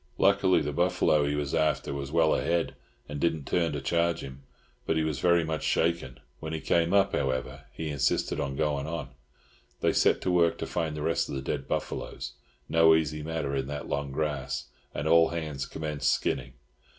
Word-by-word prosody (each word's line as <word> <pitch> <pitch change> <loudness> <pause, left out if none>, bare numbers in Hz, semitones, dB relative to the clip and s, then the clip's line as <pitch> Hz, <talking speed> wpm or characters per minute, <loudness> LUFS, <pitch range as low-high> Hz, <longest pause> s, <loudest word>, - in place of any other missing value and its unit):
Luckily, 95 -3 +4
the 75 0 -3
buffalo 80 -3 +2
he 75 - 0
was 75 -1 -2
after 75 -1 +1
was 70 0 -5
well 80 -1 +4
ahead, 85 -1 0 0.3
and 75 0 -5
did 85 +1 +2
not 75 -3 -9
turn 85 -2 +1
to 75 - -2
charge 85 +3 +1
him, 65 0 -9 0.5
but 80 - +1
he 80 - +2
was 80 -3 -2
very 85 -1 +4
much 80 -1 -2
shaken; 80 -6 0 0.2
when 80 0 -5
he 80 - -2
came 85 +2 +1
up, 100 0 +4
however, 65 +1 -2
he 80 -1 -5
insisted 70 -1 0
on 70 -1 -2
going 75 -1 -1
on. 80 -5 -4 0.7
They - - +2
set - - +3
to 90 - 0
work 85 -2 +3
to - - -3
find 80 -3 -2
the 75 - -3
rest 80 +1 0
of - - -4
the 65 - -3
dead - - -3
buffaloes—no 80 -1 0
easy 75 -1 -1
matter 75 -3 -2
in 65 -1 -1
that 75 -1 -5
long 70 -1 -2
grass—and 75 0 -4
all 80 0 +6
hands 75 -5 -4
commenced 75 -4 -1
skinning. 65 0 -1
75 Hz, 190 wpm, -28 LUFS, 70-85 Hz, 0.7 s, all